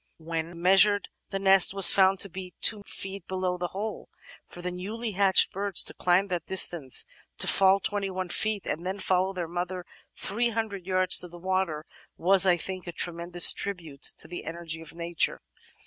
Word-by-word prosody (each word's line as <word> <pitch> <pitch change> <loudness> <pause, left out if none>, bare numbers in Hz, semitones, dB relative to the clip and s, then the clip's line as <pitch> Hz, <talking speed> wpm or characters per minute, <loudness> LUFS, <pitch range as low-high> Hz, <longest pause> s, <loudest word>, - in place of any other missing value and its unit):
When 165 +1 -6
measiu*ed 195 +4 +3 0.2
the 195 - -4
nest 195 0 +4
was 195 -2 +11
found 190 -1 +3
to - - +3
be 185 -1 -10
2 215 -2 +4
feet 195 -1 -7
below 185 -1 -3
the 175 - -3
hole. 205 +5 -7 0.4
For 175 - -13
the 180 - -4
newly 215 +6 -6
hatched 195 -1 +3
birds 200 -1 +1
to - - -5
climb 180 +2 +1
that 175 -2 -4
distance, 170 -7 +3 0.3
to - - +2
fall 195 0 +3
21 195 -3 -4
feet, 215 +1 -2
and 165 - -5
then 190 +2 -4
follow 185 -1 0
their 180 -3 -5
mother 180 +1 -5 0.3
300 220 -3 -3
yards 185 -1 +3
to 180 - -1
the 175 0 -14
water 185 -4 -3 0.3
was, 190 +2 +3
I 175 -1 +3
think, 185 +1 -7
a - - -5
tremendous 175 +1 +2
tribute 165 -8 -7 0.2
to - - -6
the 175 +2 -8
energy 165 0 -7
of 160 0 -13
nature." 170 -1 -2
185 Hz, 180 wpm, -26 LUFS, 175-195 Hz, 0.4 s, was